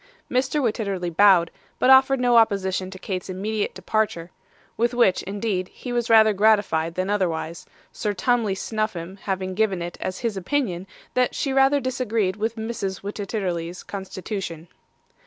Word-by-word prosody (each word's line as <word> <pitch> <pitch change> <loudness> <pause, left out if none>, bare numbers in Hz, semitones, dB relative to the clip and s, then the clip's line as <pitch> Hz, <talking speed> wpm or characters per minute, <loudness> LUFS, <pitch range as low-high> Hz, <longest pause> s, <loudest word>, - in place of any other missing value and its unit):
Mr. 260 +4 +1
Wititterly 200 -7 -2
bowed, 185 -3 +5 0.3
but 260 - +4
offered 265 0 +6
no 245 -1 +3
opposition 190 -4 +2
to 190 - -9
Kate's 185 0 -5
immediate 205 +3 -2
departure; 190 -3 -1 0.4
with 235 +2 0
which, 235 -7 +3
indeed, 200 -2 -2
he 245 +5 -7
was 240 0 -1
rather 220 -1 +6
gratified 195 -6 +2
than 185 +1 -1
otherwise, 170 -5 -2 0.2
Sir 210 - -2
Tumley 215 0 +1
Snuffim 195 -4 -3
having 190 -1 -3
given 200 -2 +1
it 175 0 -6
as 185 - -3
his 225 -3 0
opinion, 190 -3 -2 0.3
that 250 0 +1
she 275 - -1
rather 270 +1 +4
disagreed 230 -7 -1
with 220 +2 -2
Mrs. 220 -4 -4
Wititterly's 190 -4 -4
constitution. 190 -4 -6
200 Hz, 145 wpm, -24 LUFS, 185-230 Hz, 0.4 s, offered